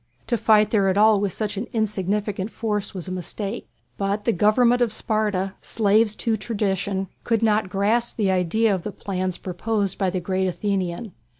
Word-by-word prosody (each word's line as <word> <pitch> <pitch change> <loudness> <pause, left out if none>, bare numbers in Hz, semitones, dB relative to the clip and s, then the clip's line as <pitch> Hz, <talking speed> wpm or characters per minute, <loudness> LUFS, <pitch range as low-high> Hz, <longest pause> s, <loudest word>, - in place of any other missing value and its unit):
To 240 - 0
fight 215 -1 +4
there 200 -3 +3
at 190 - +1
all 215 0 +5
with 200 -2 0
such 210 0 -3
an 210 - -3
insignificant 205 -2 -1
force 210 -3 -3
was 185 -1 -5
a - - -5
mistake. 195 +4 -5 0.3
But 200 +1 -1
the 235 - +3
Government 235 +5 +3
of 235 -3 +2
Sparta, 210 -4 -1
slaves 215 0 +2
to 225 -2 0
tradition, 195 -3 -1 0.2
could 230 -1 +1
not 215 -3 +2
grasp 215 +5 0
the 200 -4 +2
idea 190 +4 +2
of 185 - -1
the 210 - -5
plans 185 -2 -3
proposed 200 +2 -2
by 190 - +2
the 185 0 -2
great 190 +1 -1
Athenian. 185 +2 -2
205 Hz, 180 wpm, -23 LUFS, 190-220 Hz, 0.3 s, all